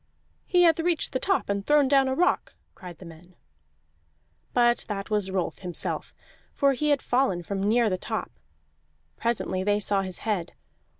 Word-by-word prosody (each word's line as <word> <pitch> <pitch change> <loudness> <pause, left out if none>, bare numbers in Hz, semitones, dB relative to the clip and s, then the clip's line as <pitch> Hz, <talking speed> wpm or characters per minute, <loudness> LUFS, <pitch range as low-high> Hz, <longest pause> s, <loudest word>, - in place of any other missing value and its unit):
"He 355 -1 +4
hath 330 -2 +4
reached 335 0 0
the 260 - 0
top 385 +5 0
and 200 0 -2
thrown 295 +3 +4
down 270 -1 +4
a 260 - 0
rock," 355 +4 +1 0.2
cried 180 -3 -11
the 185 - -12
men. 170 +2 -14 1.2
But 240 0 +3
that 200 -1 -5
was 205 -2 +1
Rolf 190 -2 -2
himself, 180 -3 -3 0.4
for 280 -1 +3
he 300 +4 -1
had 285 -2 +2
fallen 245 -9 +1
from 195 +3 -4
near 225 +3 +3
the 185 -3 -1
top; - - -4 0.8
presently 220 -5 -1
they 205 +1 +2
saw 200 -1 +2
his 185 -2 -6
head. 195 -6 -2
210 Hz, 170 wpm, -26 LUFS, 190-275 Hz, 1.2 s, He